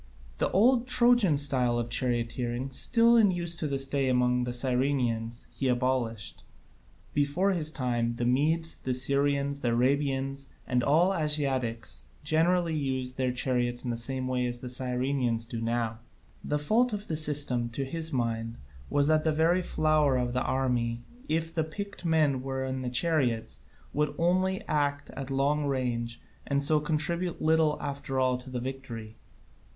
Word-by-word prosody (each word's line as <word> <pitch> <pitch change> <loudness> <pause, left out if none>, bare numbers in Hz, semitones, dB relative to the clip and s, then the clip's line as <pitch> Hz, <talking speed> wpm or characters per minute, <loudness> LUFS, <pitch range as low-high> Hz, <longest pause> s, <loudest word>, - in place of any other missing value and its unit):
The - - +1
old 240 +5 +3
Trojan 240 - +4
type 135 -3 +2
of 120 0 -1
charioteering, 120 +1 -2
still 230 - +4
in 220 -3 +5
use 170 -2 0
to 160 - -2
this 135 -1 0
day 135 -1 0
among 125 0 +2
the 125 - -3
Cyrenaeans, 125 -2 0
he 135 - -2
abolished; 120 -3 -1 0.7
before 145 +7 +1
his 165 -5 +2
time 120 -5 -1
the 120 - -2
Medes, 160 +6 +1
the 130 -1 -2
Syrians, 140 +2 +1
the 120 - -1
Arabians, 135 +2 0 0.2
and 125 -1 +1
all 170 +8 +3
Asiatics 130 - -1 0.2
generally, 165 +3 +2
used 130 -4 -2
their 130 -1 +1
chariots 125 -1 -1
in 120 - -1
the - - -2
same 130 +2 -2
way 125 -1 0
as 120 0 -2
the 125 +1 -7
Cyrenaeans 125 -2 0
do 115 -1 -6
now. 115 -1 -2 0.4
The 150 - -1
fault 220 +11 +1
of 210 0 -5
the 160 - -2
system 145 -6 +2
to 135 +4 -4
his 160 +3 -1
mind 115 -2 -2 0.3
was 145 0 +2
that 155 +1 +3
the 160 - +2
very 165 +4 +2
flower 155 -5 +2
of 125 -1 -1
the 130 - 0
army, 120 -3 -1 0.3
if 165 +1 -1
the 160 -2 0
picked 200 +4 -7
men 155 -5 +2
were 130 0 -3
in 130 0 -3
the 125 - -3
chariots, 125 -5 0 0.4
could 150 0 0
only 185 +3 +1
act 145 -1 -1
at 135 -1 -7
long 140 +2 +1
range 120 -4 -2 0.3
and 140 0 0
so 150 +2 +4
contribute 165 +3 -1
little 155 -1 +2
after 140 -2 -3
all 130 -1 +1
to 125 +1 -11
the 125 -1 -4
victory. 120 -4 -7
135 Hz, 165 wpm, -28 LUFS, 125-155 Hz, 0.7 s, in